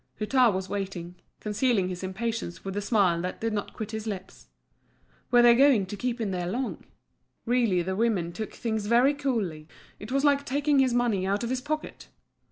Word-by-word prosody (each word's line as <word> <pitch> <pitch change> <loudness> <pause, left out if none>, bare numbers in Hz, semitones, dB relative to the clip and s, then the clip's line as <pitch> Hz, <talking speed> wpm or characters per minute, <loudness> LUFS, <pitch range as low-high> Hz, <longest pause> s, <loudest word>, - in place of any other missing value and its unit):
Hutin 245 +2 +4
was 190 -1 -3
waiting, 190 -4 -4 0.3
concealing 210 -2 +1
his 180 -1 -5
impatience 195 -2 -4
with 195 0 -4
a 205 - -1
smile 200 -5 +2
that 180 +1 -4
did 225 -1 -2
not 205 -1 -3
quit 220 -1 -5
his 220 0 -5
lips. 190 -3 -7 0.8
Were 245 -1 +5
they 240 0 +8
going 255 -5 +5
to 185 - -6
keep 240 +3 -3
him 215 -4 -1
there 180 -1 -2
long? 245 +7 -3 0.6
Really 230 -7 +2
the 190 +2 -2
women 200 -6 0
took 220 +2 -5
things 220 -3 -3
very 245 +5 +4
coolly, 220 - -2 0.3
it 210 +4 -8
was 275 +2 +1
like 285 -1 +3
taking 285 +1 +1
his 255 -2 +3
money 220 -6 +1
out 200 +3 0
of 235 - -2
his 260 -1 -1
pocket. 305 +3 -5
220 Hz, 190 wpm, -27 LUFS, 190-245 Hz, 0.8 s, they